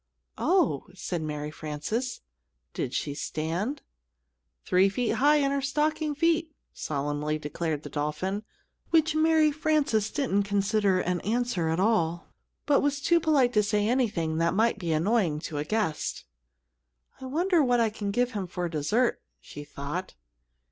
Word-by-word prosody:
"Oh!" 340 - +2
said 175 -2 -3
Mary 150 -1 -4
Frances, 155 - -4 0.5
"did 125 - -3
she 145 - -2
stand?" 165 - -3 0.8
"Three 185 +2 +4
feet 240 +3 -1
high 295 +2 +6
in 280 -2 +2
her 280 0 0
stocking 300 +2 0
feet," 330 0 +1 0.2
solemnly 145 +1 -2
declared 155 0 -3
the - - -7
dolphin, 150 +7 -2 0.5
which 320 -1 +3
Mary 310 -1 +4
Frances 295 -8 +1
didn't 240 -8 0
consider 200 -1 +1
an 180 -1 -1
answer 225 -6 0
at 160 +2 0
all; 175 -5 0 0.3
but 290 -2 +4
was 290 0 0
too 340 +4 +3
polite 290 -7 +3
to 210 - +4
say 210 0 +1
anything 210 -11 0
that 170 +2 +1
might 225 +1 +2
be 170 -4 -2
annoying 170 0 +2
to 155 -3 -4
a - - -1
guest. 160 - -2 0.9
"I 265 - -8
wonder 340 +4 +2
what 245 -2 +3
I 225 -2 +2
can 210 -1 -4
give 245 +4 +1
him 200 -5 -4
for 175 0 -3
dessert?" 170 - 0 0.2
she 145 - -10
thought. 145 - -6
210 Hz, 150 wpm, -27 LUFS, -, 0.9 s, high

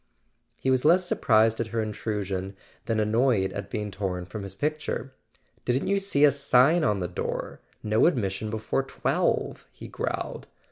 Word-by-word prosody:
He 130 - 0
was 130 -1 +2
less 180 +4 +5
surprised 110 -7 +3
at 115 - -1
her 115 +1 -3
intrusion 100 -3 -3 0.3
than 115 -1 0
annoyed 110 -2 +2
at 100 - -6
being 105 -3 -3
torn 90 -2 -3
from 100 +4 -7
his 100 -1 -6
picture. 150 +1 -3 0.5
"Didn't 125 +2 0
you 200 0 +2
see 170 -7 +3
a 145 - +6
sign 140 +4 +4
on 105 -8 +1
the 90 - -1
door? 90 - -4 0.2
'No 110 +5 +3
admission 110 - -1
before 110 +4 -1
twelve' 135 - -1
" - - -40
he - - -10
growled. - - -4
110 Hz, 170 wpm, -26 LUFS, 100-135 Hz, 0.5 s, a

